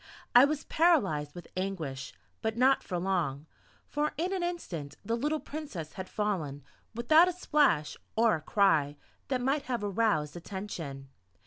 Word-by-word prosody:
I 245 +2 +9
was 300 +1 -2
paralyzed 195 - +2
with 175 - -9
anguish, 165 -8 -3 0.3
but 220 0 -2
not 265 +2 +4
for 180 - -4
long; 170 -6 -1 0.4
for 300 +1 -1
in 355 +5 -1
an 380 - -1
instant 195 - -4
the 230 - 0
little 300 +6 0
Princess 275 - -7
had 190 -1 -7
fallen, 165 -10 -2 0.3
without 310 +9 +6
a - - -2
splash, 295 - +2 0.2
or 225 0 +4
a 155 - -1
cry 150 -6 +2 0.3
that 255 -2 0
might 275 +3 0
have 245 -4 -2
aroused 200 -7 +1
attention. 165 -7 -6
205 Hz, 150 wpm, -30 LUFS, -, 0.4 s, I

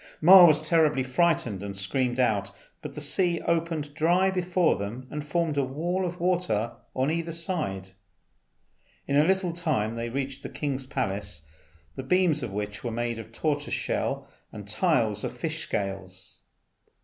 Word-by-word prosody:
Ma 180 +2 +10
was 155 -2 +5
terribly 155 -3 +2
frightened 130 - +1
and 100 -1 -6
screamed 120 +6 -1
out; 100 -5 +1 0.3
but 150 -3 -8
the - - -5
sea 170 +3 +1
opened 165 -3 -1
dry 175 +5 +3
before 180 -1 +2
them 110 +6 -5
and 150 0 -4
formed 160 0 -1
a - - +2
wall 175 +8 -1
of 175 +1 -6
water 170 - 0 0.2
on 130 +3 +1
either 165 0 -2
side. 155 - -3 1.1
In 140 - -1
a 145 - +6
little 185 0 +1
time 155 - -1
they 115 0 -3
reached 135 +2 -4
the - - -6
king's 135 -3 -3
palace, 100 - -3 0.5
the - - -4
beams 165 +2 +2
of 120 -5 -4
which 105 +1 -5
were 120 - -2
made 120 0 -2
of 115 0 -10
tortoise 145 +4 -1
shell - - -2 0.2
and - - -9
the - - -5
tiles - - +1
of - - -4
fishes' - - -3
scales. 95 -2 -5
145 Hz, 165 wpm, -27 LUFS, 115-170 Hz, 1.1 s, Ma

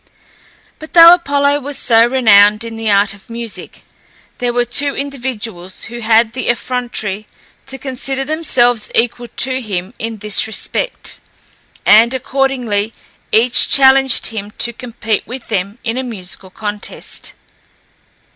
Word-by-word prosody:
But 315 - -11
though 335 0 +10
Apollo 285 -4 +1
was 285 0 -6
so 230 -1 +4
renowned 210 -4 +4
in 230 -1 -7
the 225 -1 -3
art 200 0 +2
of 200 +2 -19
music, 230 -1 -7 0.6
there 245 -1 0
were 240 0 0
two 280 +4 -1
individuals 240 -9 -5
who 240 +2 -7
had 225 0 +3
the 255 0 -4
effrontery 225 -3 -3 0.4
to 270 0 -6
consider 270 0 -4
themselves 245 -7 +1
equal 240 +1 0
to 260 +3 0
him 195 -2 -5
in 225 0 -5
this 210 +1 +2
respect, 220 - -3 0.7
and, 230 +4 +5
accordingly, 250 -5 -1 0.4
each 235 +2 +4
challenged 265 -2 +4
him 210 -2 -3
to 235 - +1
compete 225 -3 -4
with 250 0 -9
them 200 0 -2
in 230 +1 -2
a - - -2
musical 190 -5 -6
contest. 210 +1 -4
235 Hz, 135 wpm, -15 LUFS, 215-265 Hz, 0.7 s, though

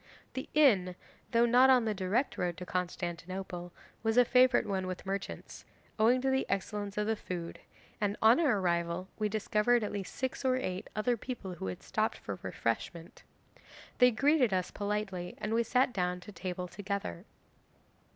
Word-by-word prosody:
'The 260 - -5
inn, 200 -12 +4 0.3
though 235 0 +4
not 250 +3 +6
on 250 -3 +5
the 215 - 0
direct 210 +7 0
road 175 -5 -2
to 180 - -6
Constantinople, 175 0 -4 0.3
was 225 +1 0
a 245 - +7
favourite 250 0 +4
one 190 -2 -2
with 185 +1 -5
merchants, 195 +1 -5 0.4
owing 235 +4 +5
to 265 +1 +1
the 265 0 +2
excellence 205 0 -3
of 210 - +1
the 220 +1 +1
food, 175 -5 -6 0.4
and 205 0 0
on 225 +5 +6
our 275 -11 +3
arrival 170 0 -1
we 210 -1 +1
discovered 215 +2 +2
at 210 - -2
least 200 -2 -5
six 260 +1 -3
or 260 -1 +3
eight 185 -8 -3
other 240 +3 +1
people 230 -5 -6
who 160 - -6
had 90 - -6
stopped - - -1
for - - -6
refreshment. 165 +8 -3 0.8
They 250 0 +8
greeted 270 0 +3
us 185 -1 0
politely, 205 -3 -3
and 215 - -3
we 230 - +3
sat 250 +2 +2
down 180 -1 -1
to 210 - -10
table 180 -1 -5
together. 200 - -5
205 Hz, 170 wpm, -31 LUFS, 180-240 Hz, 0.8 s, They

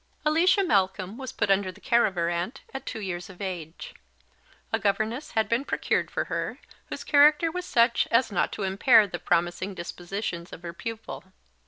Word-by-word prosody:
Alicia 350 +6 +4
Malcolm 190 - +1
was 260 -1 -6
put 200 - 0
under 195 -1 +2
the - - -17
care 235 0 +3
of 195 - -6
her 170 -1 0
aunt 175 +10 -3
at 270 0 -7
two - - -4
years 180 -2 -5
of 185 - -13
age. 175 -5 -6 0.8
A - - +2
governess 215 +7 -1
had 220 -1 +1
been 235 +3 +1
procured - - -1
for - - -1
her, - - -3 0.3
whose - - -6
character 300 +2 +5
was 360 +1 -4
such 235 0 +3
as 230 0 +3
not 185 - 0
to 205 - -4
impair 210 +4 +5
the 175 -3 -6
promising 175 +3 0
dispositions 175 0 -5
of 170 - -10
her 170 -1 -6
pupil. 225 +4 -7
200 Hz, 185 wpm, -26 LUFS, 180-245 Hz, 0.8 s, character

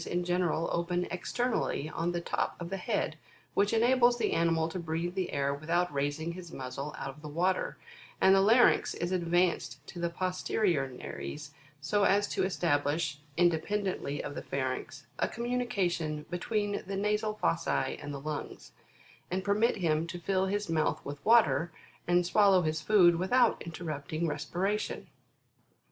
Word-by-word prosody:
in 175 0 -1
general 175 -2 0
open 175 +1 0
externally 220 - -1
on 165 +2 -1
the 175 - -2
top 170 - -2
of 170 0 -6
the 195 - -1
head, 185 -4 -1 0.4
which 200 0 +2
enables 240 +1 +4
the - - 0
animal 165 -1 +2
to 170 +3 -5
breathe 170 +1 -2
the 185 -2 -2
air 140 0 0
without 165 +3 0
raising 145 +4 -1
his 175 -1 -9
muzzle 135 +2 -6
out - - -4
of 150 - -16
the 150 - -7
water, 180 +5 0 0.4
and 190 - +6
the 195 - +5
larynx 230 +5 +4
is 175 +1 -3
advanced 175 0 +1
to 175 - -9
the 170 0 0
posterior 180 -4 0
nares, 145 +3 -7 0.3
so 200 +8 +1
as 205 +1 +3
to - - -1
establish, 150 -4 0 0.2
independently 175 -2 0
of - - -5
the - - -5
pharynx, 135 +1 -4
a - - +2
communication 190 -11 -1
be 175 - -2
tween 205 0 -1
the 195 0 -3
nasal 210 +1 0
fossae 85 - 0
and 145 -1 -6
the 140 - -5
lungs, 150 +1 -6 0.6
and 185 +1 -2
permit 210 +4 +2
him 165 -3 +1
to 175 +1 -5
fill 190 +2 0
his 205 +1 -1
mouth 155 -2 +1
with 145 0 -7
water, 170 - +4 0.4
and 175 0 +3
swallow 195 -1 +4
his 155 0 -1
food 175 -2 +5
without 235 +7 +3
interrupting 160 -1 -4
respiration. 185 +7 -2
175 Hz, 160 wpm, -30 LUFS, 155-195 Hz, 0.6 s, and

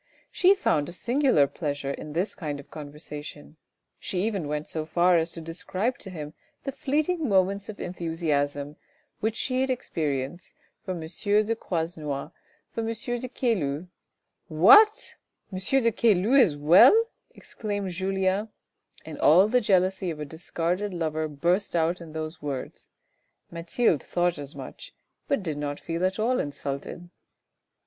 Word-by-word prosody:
She 375 +2 +5
found 150 - +1
a - - -6
singular 245 - +3
pleasure 145 -1 -3
in 150 +1 -7
this 180 +6 -1
kind 150 -5 -5
of 140 - -13
conversation, 150 0 -9 0.4
she 185 -1 -2
even 200 -8 -1
went 150 +1 -3
so 155 - -2
far 175 +3 +3
as 165 0 +1
to 165 - -6
describe 185 +8 -3
to 190 - -9
him 155 -4 -7 0.3
the 275 - -3
fleeting 295 +3 -1
moments 195 +1 +2
of 210 - -8
enthusiasm 150 -4 -2 0.4
which 220 +1 -1
she 255 +1 -1
had 265 - 0
experienced 155 - -3 0.3
for 185 - -3
M. 170 - -6
de 205 +6 0
Croisenois, 160 -7 -3 0.4
for 230 - -3
M. 225 - -3 0.3
de 255 - -4
Caylus 185 - -1 0.4
" - - -53 0.2
What! 430 - +7 0.4
M. 185 - -3
de 230 +4 +2
Caylus 225 +4 +4
as 150 -7 -3
well! 175 - +7
" - - -51
exclaimed 205 -3 -4
Julien, 190 +3 0 0.6
and 155 -2 -8
all 180 +7 +6
the 250 +3 +3
jealousy 190 -2 +2
of 155 -2 -5
a 150 - -4
discarded 175 +5 -3
lover 160 -2 -1
burst 175 +7 0
out 170 +2 +1
in 160 -2 -10
those 160 +1 -5
words, 140 -3 -6 0.6
Mathilde 170 - +1
thought 175 -2 0
as 145 +1 -8
much, - - -9 0.3
but 280 -8 0
did 155 -4 -3
not 145 -1 -3
feel 165 +1 -3
at 185 0 +1
all 240 +4 +1
insulted. 145 +4 -5
175 Hz, 155 wpm, -26 LUFS, 150-210 Hz, 0.6 s, What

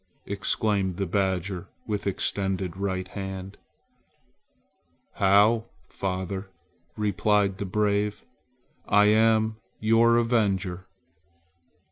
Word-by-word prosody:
exclaimed 100 -2 -1
the 100 - -1
badger 95 -1 -1 0.2
with 105 -2 -3
extended 95 -2 -1
right 95 -1 -3
hand. 95 0 -6 1.6
"How, 105 +4 +4 0.2
father," 95 0 -4 0.5
replied 105 -1 +1
the 100 - -3
brave; 105 +1 0 0.6
"I 105 +1 +5
am 110 +1 +3 0.2
your 115 +2 +4
avenger!" 100 -6 0
100 Hz, 80 wpm, -26 LUFS, 95-105 Hz, 1.6 s, I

